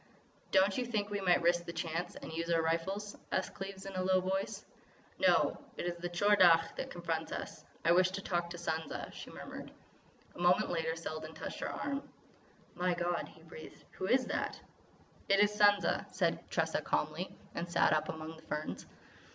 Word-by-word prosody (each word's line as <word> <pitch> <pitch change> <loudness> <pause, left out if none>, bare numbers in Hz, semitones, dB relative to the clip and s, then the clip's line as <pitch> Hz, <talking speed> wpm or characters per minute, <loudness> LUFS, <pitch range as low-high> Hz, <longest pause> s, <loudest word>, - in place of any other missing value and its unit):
"Don't 195 +3 +4
you 250 - 0
think 210 -3 -1
we 205 -1 -1
might 180 -2 +4
risk 175 0 +3
the - - -4
chance 165 +1 -3
and 160 - -8
use 165 +1 -2
our 165 -1 +3
rifles?" 190 +6 -1 0.2
asked 185 - 0
Cleves 195 0 -7
in 195 - -6
a 185 - -1
low 185 0 +4
voice. 190 +1 -2 0.5
"No. - - +4 0.2
It - - -3
is 175 -1 -1
the 175 +1 -4
Tchor 205 +4 +4
Dagh 165 -2 +6
that - - -4
confronts 165 -2 -3
us. - - -5 0.2
I 170 - +6
wish 180 +1 +5
to 190 +1 -4
talk 175 -1 -1
to 175 - -6
Sansa," 160 -1 -3
she - - -8
murmured. - - -8 0.6
A - - -13
moment 175 +1 +4
later 160 -1 0
Selden 155 -1 -6
touched - - -6
her - - -2
arm. 280 0 -2 0.7
"My 180 0 +1
God," 175 0 -1
he 160 - -17
breathed, 160 -1 -11
"who 185 - -4
is 255 +3 +4
that!" - - -2 0.7
"It 195 0 +5
is 205 0 +5
Sansa," 205 -1 +4
said - - 0
Tressa - - +1
calmly, - - -2 0.2
and 170 +1 -3
sat 170 - +4
up 155 - +1
among 160 0 -6
the - - -14
ferns. 150 0 -4
175 Hz, 190 wpm, -34 LUFS, 165-195 Hz, 0.7 s, Dagh